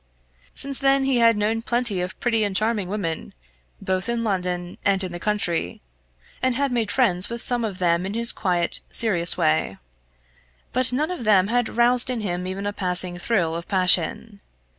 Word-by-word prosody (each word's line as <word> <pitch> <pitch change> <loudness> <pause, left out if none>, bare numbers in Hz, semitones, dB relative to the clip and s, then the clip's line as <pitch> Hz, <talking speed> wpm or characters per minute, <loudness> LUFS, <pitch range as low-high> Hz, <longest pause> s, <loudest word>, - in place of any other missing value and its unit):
Since 275 -1 0
then 275 0 +2
he 270 -2 +1
had 230 -2 +4
known 220 +2 0
plenty 235 -5 -1
of 180 +1 -6
pretty 225 -3 +1
and 200 -2 -2
charming 215 -2 0
women, 180 -6 -4 0.4
both 185 +3 -2
in 235 -1 -1
London 180 -4 -3
and 195 -1 +2
in 185 - -5
the 175 - -6
country, 175 - -1 0.6
and 255 -1 +1
had 280 +1 -1
made 230 -4 -1
friends 205 -7 +2
with 235 0 -5
some 240 0 +1
of 205 -4 -4
them 170 -2 +1
in 200 - -5
his 235 +1 +3
quiet 175 -2 -1
serious 180 -7 +4
way. 155 - 0 1.0
But 255 0 +3
none 300 +7 -1
of 355 -9 -5
them 200 -3 +3
had 245 -1 0
roused 240 +2 +2
in 245 -3 -2
him 180 -2 -3
even 190 +2 -5
a 205 - -2
passing 180 -2 0
thrill 175 -5 0
of 170 +1 -6
passion. 190 +2 +1
205 Hz, 185 wpm, -23 LUFS, 180-235 Hz, 1.0 s, had